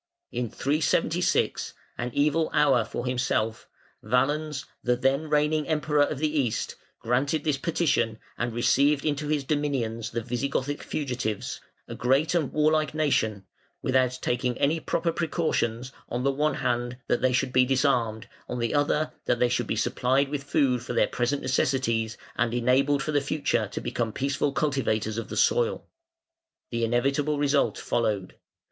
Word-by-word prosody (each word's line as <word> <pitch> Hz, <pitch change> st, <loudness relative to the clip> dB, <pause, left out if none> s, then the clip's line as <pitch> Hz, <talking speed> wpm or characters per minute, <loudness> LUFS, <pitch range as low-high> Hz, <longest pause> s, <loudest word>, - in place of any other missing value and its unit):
In 120 Hz, -2 st, -2 dB
376 145 Hz, +7 st, 0 dB, 0.2 s
an 120 Hz, -, -3 dB
evil 150 Hz, +2 st, +2 dB
hour 135 Hz, -6 st, +4 dB
for 115 Hz, +2 st, -5 dB
himself 120 Hz, -3 st, -1 dB, 0.3 s
Valens, 140 Hz, +5 st, 0 dB, 0.2 s
the 125 Hz, 0 st, +2 dB
then 135 Hz, +5 st, 0 dB
reigning 150 Hz, 0 st, +2 dB
Emperor 150 Hz, -2 st, +1 dB
of 145 Hz, 0 st, +1 dB
the 150 Hz, +1 st, 0 dB
East, 120 Hz, -5 st, -1 dB, 0.2 s
granted 135 Hz, +6 st, 0 dB
this 150 Hz, -3 st, 0 dB
petition 155 Hz, -9 st, +1 dB, 0.2 s
and 120 Hz, 0 st, -2 dB
received 140 Hz, +5 st, +2 dB
into 150 Hz, -1 st, -1 dB
his 150 Hz, -2 st, 0 dB
dominions 130 Hz, -7 st, -1 dB
the 115 Hz, 0 st, -3 dB
Visigothic 135 Hz, +3 st, -2 dB
fugitives, 125 Hz, -8 st, -3 dB, 0.3 s
a -, -, -6 dB
great 135 Hz, +7 st, +2 dB
and 160 Hz, -7 st, +1 dB
warlike 155 Hz, 0 st, +2 dB
nation, 110 Hz, -10 st, +1 dB, 0.4 s
without 130 Hz, -1 st, +2 dB
taking 125 Hz, 0 st, 0 dB
any 150 Hz, +3 st, +2 dB
proper 165 Hz, +1 st, -1 dB
precautions, 130 Hz, -8 st, -1 dB, 0.2 s
on 125 Hz, +1 st, -2 dB
the 140 Hz, -, +3 dB
one 150 Hz, +3 st, 0 dB
hand, 120 Hz, 0 st, -1 dB
that -, -, +1 dB
they 130 Hz, 0 st, +3 dB
should 125 Hz, 0 st, 0 dB
be 130 Hz, -, +6 dB
disarmed, 125 Hz, -4 st, +1 dB, 0.2 s
on 125 Hz, -, -3 dB
the 115 Hz, -1 st, -1 dB
other, 150 Hz, +1 st, +1 dB
that -, -, +2 dB
they 125 Hz, 0 st, +2 dB
should 120 Hz, -2 st, 0 dB
be -, -, -1 dB
supplied 130 Hz, +5 st, +1 dB
with 145 Hz, -1 st, -4 dB
food 140 Hz, -4 st, +2 dB
for 120 Hz, -, -5 dB
their -, -, +4 dB
present 125 Hz, +4 st, -1 dB
necessities 130 Hz, -4 st, 0 dB, 0.2 s
and 120 Hz, -1 st, 0 dB
enabled 135 Hz, +3 st, +2 dB
for 155 Hz, -, -2 dB
the 145 Hz, -1 st, +2 dB
future 145 Hz, +2 st, 0 dB
to -, -, -5 dB
become 115 Hz, -2 st, -2 dB
peaceful 140 Hz, +3 st, -1 dB
cultivators 115 Hz, -7 st, 0 dB
of -, -, -5 dB
the -, -, -5 dB
soil. 480 Hz, -1 st, +2 dB, 0.9 s
The 115 Hz, -1 st, -1 dB
inevitable 140 Hz, +6 st, +1 dB
result 145 Hz, 0 st, +2 dB
followed. 105 Hz, -5 st, -1 dB
135 Hz, 155 wpm, -26 LUFS, 120-150 Hz, 0.9 s, be